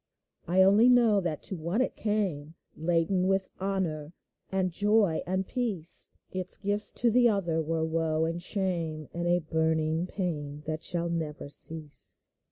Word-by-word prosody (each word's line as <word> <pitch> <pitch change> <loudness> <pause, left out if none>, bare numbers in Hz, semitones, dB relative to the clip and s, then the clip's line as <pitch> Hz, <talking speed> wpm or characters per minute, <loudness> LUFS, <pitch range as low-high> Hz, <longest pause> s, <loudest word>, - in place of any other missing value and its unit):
I 185 +3 +4
only 205 +6 +6
know 230 -5 +5
that 165 -5 -3
to 190 - -4
one 170 +6 -2
it 260 - +1
came 185 -8 -2 0.2
Laden 175 +3 +1
with 195 0 0
honor, 175 -5 -2 0.4
and 190 -1 0
joy, 205 -2 +2
and 190 +1 -1
peace; 205 -10 +2 0.2
Its 185 0 -1
gifts 205 +1 +1
to 235 -1 +2
the 240 +1 +5
other 175 -6 0
were 160 +1 -1
woe 160 -1 0
and 165 +1 -3
shame, 170 -6 -2
And 170 0 -2
a 175 0 +4
burning 160 0 0
pain 150 -6 -4
that 155 0 -3
shall 170 -1 0
never 160 -4 -4
cease 150 0 -5
175 Hz, 155 wpm, -28 LUFS, 160-195 Hz, 0.4 s, only